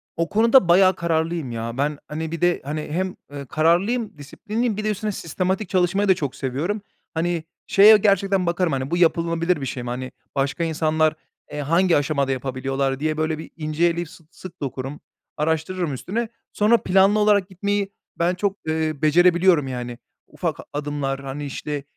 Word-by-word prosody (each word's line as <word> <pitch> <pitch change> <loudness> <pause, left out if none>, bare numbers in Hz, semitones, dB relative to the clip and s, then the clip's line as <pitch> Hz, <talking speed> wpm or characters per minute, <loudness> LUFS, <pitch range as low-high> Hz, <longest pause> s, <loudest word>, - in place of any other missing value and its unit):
O 165 0 -1
konuda 230 0 +5
bayağı 185 +1 +5
kararlıyım 165 -4 -1
ya. 115 +1 -4
Ben, 145 +2 0
hani, 160 +1 -4
bir 165 - -5
de, 175 0 +2
hani, 150 +2 -3
hem, 185 +3 -2 0.2
eee, 140 -1 -7
kararlıyım, 175 - +1
disiplinliyim, 210 - -3
bir 215 - -3
de 215 - 0
üstüne 210 +1 -2
sistematik 185 +3 -2
çalışmayı 190 +2 +2
da 190 - +6
çok 145 -6 -4
seviyorum. 150 +11 -2 0.3
Hani, 170 0 -1 0.2
şeye 210 +2 +8
gerçekten 195 -2 +2
bakarım, 170 0 +1
hani, 135 +2 -3
bu 175 - +1
yapılabilir 170 -1 +2
bir - - -2
şey 125 -1 -4
mi? 120 - -5
Hani, 130 +1 -4 0.2
başka 140 +4 0
insanlar, 155 -1 +1 0.4
eee, 150 - -5
hangi 170 +5 +3
aşamada 140 -2 0
yapabiliyorlar 135 +1 -2
diye, 155 +1 -1
böyle, 155 0 0
bir 160 - -9
ince 155 +1 0
eleyip 170 -1 0
sı 175 -1 -16
sık 185 - -12
dokurum, 135 +1 -5 0.4
araştırırım 160 +2 -1
üstüne. 220 - -3 0.2
Sonra, 215 +3 +4
planlı 195 +3 +4
olarak 205 -2 +3
gitmeyi 200 +1 -2 0.3
ben 170 +1 +2
çok, 195 +1 -1
eee, 155 0 0
becerebiliyorum, 175 0 +4
yani, 125 -2 -5 0.3
ufak - - -3 0.2
adımlar, 145 -2 -2
hani, 135 +2 -6
işte, 145 +1 -4
165 Hz, 170 wpm, -22 LUFS, 145-190 Hz, 0.4 s, şeye